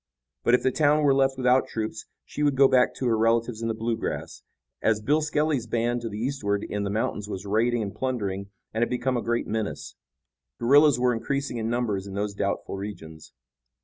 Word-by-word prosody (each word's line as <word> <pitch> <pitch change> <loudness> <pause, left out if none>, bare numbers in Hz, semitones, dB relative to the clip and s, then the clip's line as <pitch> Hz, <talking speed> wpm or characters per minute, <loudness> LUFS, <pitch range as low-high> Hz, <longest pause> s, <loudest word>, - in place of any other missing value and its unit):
But 120 - +5
if - - -1
the 130 - +3
town 150 +2 +3
were 140 -2 +5
left 135 0 +2
without 130 0 +3
troops 110 -1 -4 0.2
she - - -6
would 145 -2 +2
go 135 0 +6
back 130 -1 +3
to 130 - -4
her 115 -2 +3
relatives 115 +1 +1
in 115 - -1
the 115 - -1
Bluegrass, 115 0 -3 0.4
as 110 -1 +2
Bill 145 +8 +2
Skelly's 150 -5 0
band 120 +1 0
to 115 - -4
the 105 - -6
eastward 110 -5 -1
in 105 - -3
the 100 - -2
mountains 105 0 -2
was 95 -1 -5
raiding 115 +3 +1
and 100 - -5
plundering 100 -7 -3 0.2
and 110 - -1
had 120 - +2
become 125 +1 -1
a 120 - 0
great 120 +1 -1
menace. 110 -1 -4 0.7
Guerillas 145 +2 +5
were 125 0 +3
increasing 140 +2 -2
in 110 0 -2
numbers 110 -5 -1
in 100 - -7
those 100 0 -2
doubtful 100 0 -2
regions. 80 -6 -8
115 Hz, 205 wpm, -26 LUFS, 105-130 Hz, 0.7 s, go